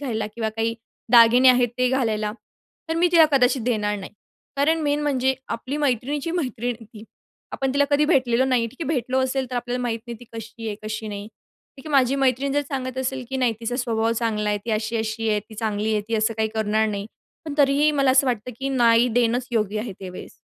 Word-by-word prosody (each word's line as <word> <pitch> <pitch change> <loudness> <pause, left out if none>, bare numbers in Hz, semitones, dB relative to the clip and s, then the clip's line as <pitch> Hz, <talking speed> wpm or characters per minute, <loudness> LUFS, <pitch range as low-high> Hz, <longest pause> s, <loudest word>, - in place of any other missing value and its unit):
घालायला 225 -6 -2
किंवा 225 -2 -2
काही 225 +1 0 0.4
दागिने 240 +2 +7
आहेत 250 -1 +5
ते 250 - +3
घालायला, 220 -5 0 0.6
तर 325 - -1
मी 345 +2 +4
तिला 330 -2 +8
कदाचित 255 -2 +3
देणार 210 -4 0
नाही. 190 - -9 0.4
कारण 320 +3 +2
मेन 290 0 +1
म्हणजे 265 -2 +1
आपली 255 +5 -4
मैत्रिणीची 285 +2 -1
मैत्रीण 245 -8 -2
आहे - - -11
ती 215 +1 -13 0.5
आपण 270 -1 -1
तिला 285 0 +4
कधी 290 +1 +3
भेटलेलो 260 -5 +2
नाही. 250 -3 +1
ठीक 235 - -13
आहे, 305 - -3
भेटलो 260 -3 0
असेल, 260 0 -1
तर 250 - -3
आपल्याला 245 +1 -2
माहीत 230 -2 -1
नाही 235 -1 -6
ती 245 - -11
कशी 225 0 -8
आहे, 210 - -2
कशी 215 0 -5
नाही. 205 0 -6 0.5
ठीक 270 +3 -13
आहे, - - -6
माझी 265 -1 +4
मैत्रीण 270 +1 +1
जर 290 - +2
सांगत 260 -2 -4
असेल, 260 0 -2
की 265 - -3
नाही, 250 -3 +2
तिचा 235 +2 -3
स्वभाव 230 -3 0
चांगला 220 -2 -1
आहे, 210 - 0
ती 235 - -3
अशी-अशी 220 0 -2
आहे, 210 -1 +1
ती 215 +1 -15
चांगली 215 0 -1
आहे, 210 - +1
ती 230 - -1
असं 220 +1 +1
काही 220 0 0
करणार 220 0 +1
नाही. 205 -1 -4 0.4
पण 300 -2 -5
तरीही 285 +2 +4
मला 275 -3 +2
असं 265 +1 +4
वाटतं, 245 -1 -2
की 270 +1 -2
नाही, 240 -2 +4
देणंच 240 +1 +1
योग्य 215 -2 0
आहे 220 -3 -5
ते 190 - -6
वेळेस. 180 - -11
245 Hz, 220 wpm, -23 LUFS, 220-265 Hz, 0.6 s, तिला